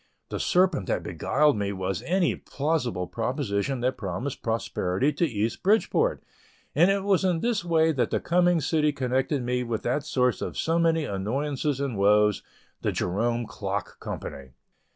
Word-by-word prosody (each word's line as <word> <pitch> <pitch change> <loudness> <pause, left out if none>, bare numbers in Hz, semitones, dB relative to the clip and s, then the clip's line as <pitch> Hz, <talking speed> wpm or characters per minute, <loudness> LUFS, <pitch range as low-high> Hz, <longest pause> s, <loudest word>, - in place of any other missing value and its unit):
The - - -4
serpent 180 - +2
that - - -1
beguiled 150 0 +2
me 100 -1 -1
was 95 -1 -3
any 180 -1 +2
plausible 140 - -2
proposition 120 - -2
that 130 +2 0
promised 110 +8 -4
prosperity 115 +2 0
to 170 +4 +1
East 110 -3 -2
Bridgeport, 225 - +2 0.5
and 175 - +5
it 195 0 +1
was 195 -2 +2
in 180 -3 +1
this 235 -6 0
way 160 -2 +3
that 135 -5 0
the - - 0
coming 175 -1 +2
city 150 0 +2
connected 130 +1 0
me 125 +1 0
with 115 -2 -3
that 135 +4 0
source 125 -3 +1
of - - -4
so 165 +1 +1
many 165 -2 +2
annoyances 135 +8 -2
and 135 -7 -2
woes, 105 0 +4 0.4
the - - 0
Jerome 115 +6 -1
Clock 100 -1 -4
Company. 65 -2 -7
135 Hz, 160 wpm, -26 LUFS, 105-165 Hz, 0.5 s, and